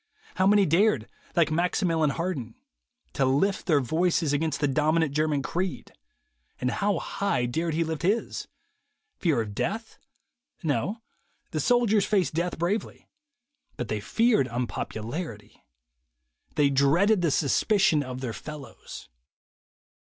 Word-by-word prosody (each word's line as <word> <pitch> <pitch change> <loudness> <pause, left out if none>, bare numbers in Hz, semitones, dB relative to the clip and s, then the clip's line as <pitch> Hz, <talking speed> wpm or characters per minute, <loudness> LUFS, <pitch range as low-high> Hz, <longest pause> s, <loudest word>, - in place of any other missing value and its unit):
How 185 - +2
many 205 0 +5
dared, 165 - +2 0.3
like 170 -3 +3
Maximilien 165 -1 +1
Harden, 140 -8 -3 0.6
to 140 - +1
lift 145 +10 +1
their 155 -5 +4
voices 160 +2 +1
against 155 0 0
the 145 - +2
dominant 155 +2 +1
German 150 -2 +1
creed, 180 +4 -3 0.7
and 125 - 0
how 205 0 0
high 200 -11 -1
dared 160 +6 -1
he 165 - +2
lift 160 -1 -4
his? 205 +7 -1 0.7
Fear 155 -10 +2
of 105 -2 -5
death? 220 - -3 0.6
No; 195 +9 -1 0.5
the - - -2
soldiers 235 -4 +3
faced 195 -6 +1
death 170 +3 -1
bravely. 180 +7 -2 0.7
But 125 - -4
they 110 - -1
feared 220 - +2
un 120 +1 -2
popularity. 110 - -6 0.9
They 145 -1 +3
dreaded 170 +10 +3
the 170 - +2
suspicion 160 +3 +2
of 130 -2 -6
their 125 -4 -3
fellows. 145 -4 -9
160 Hz, 130 wpm, -27 LUFS, 135-190 Hz, 0.9 s, many